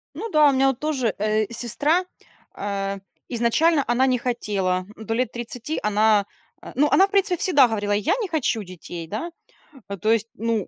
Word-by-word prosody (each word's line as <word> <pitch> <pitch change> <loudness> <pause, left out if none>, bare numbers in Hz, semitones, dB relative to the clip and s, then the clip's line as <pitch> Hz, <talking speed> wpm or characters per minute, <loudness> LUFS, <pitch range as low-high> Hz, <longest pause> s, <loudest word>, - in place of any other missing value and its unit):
Ну 455 - -5
да, 305 -5 +5
у - - +3
меня 270 +1 +3
от 270 - -3
тоже, 270 -8 -1
э, 215 +1 0
сестра, 290 - 0 0.5
а, 200 -1 -3 0.3
изначально 275 +6 +2
она 240 +2 +3
не 255 -2 +1
хотела, 200 -7 -1
до 220 0 -4
лет 250 +2 0
30 240 +5 -5
она, 210 -1 +3 0.4
а, - - -10
ну, 295 +4 +3
она 385 - +5
в - - -25
принципе 395 -3 +2
всегда 285 -9 +4
говорила: 205 -3 -2
"Я 205 0 +1
не 420 - -2
хочу 275 -8 0
детей", 175 -2 -9
да. 225 - -5 0.6
А, 200 - -5
то 215 +4 +1
есть, 225 -1 +1
ну, 225 -2 -1
235 Hz, 185 wpm, -23 LUFS, 210-290 Hz, 0.6 s, да